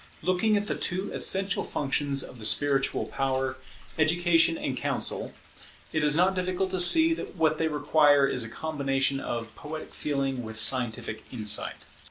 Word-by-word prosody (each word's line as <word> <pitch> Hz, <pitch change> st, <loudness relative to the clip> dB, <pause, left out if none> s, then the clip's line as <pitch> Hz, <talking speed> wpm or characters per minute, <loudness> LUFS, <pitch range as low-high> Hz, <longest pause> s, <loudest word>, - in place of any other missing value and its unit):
Looking 195 Hz, +4 st, +1 dB
at 205 Hz, -, -2 dB
the -, -, -2 dB
two 185 Hz, +1 st, -2 dB
essential 195 Hz, 0 st, +1 dB
functions 140 Hz, 0 st, -1 dB
of 125 Hz, -, -11 dB
the 110 Hz, -, -6 dB
spiritual 135 Hz, +3 st, +1 dB
power, 135 Hz, -1 st, -2 dB, 0.4 s
education 165 Hz, +1 st, +3 dB
and -, -, -3 dB
counsel, -, -, -2 dB, 0.6 s
it 155 Hz, -, 0 dB
is 150 Hz, +1 st, +4 dB
not 185 Hz, +2 st, +3 dB
difficult 185 Hz, 0 st, -2 dB
to 185 Hz, -, -1 dB
see 320 Hz, -, +7 dB
that 325 Hz, -, -7 dB
what 155 Hz, -2 st, +1 dB
they 160 Hz, -, +1 dB
require 150 Hz, -2 st, +3 dB
is 125 Hz, -3 st, -1 dB
a 110 Hz, -, -7 dB
combination 135 Hz, -1 st, -2 dB
of 115 Hz, -4 st, -6 dB
poetic 155 Hz, +1 st, -9 dB
feeling 135 Hz, -3 st, -3 dB
with 110 Hz, -1 st, -8 dB
scientific 115 Hz, -2 st, 0 dB
insight. 105 Hz, -4 st, 0 dB
150 Hz, 160 wpm, -26 LUFS, 135-175 Hz, 0.6 s, see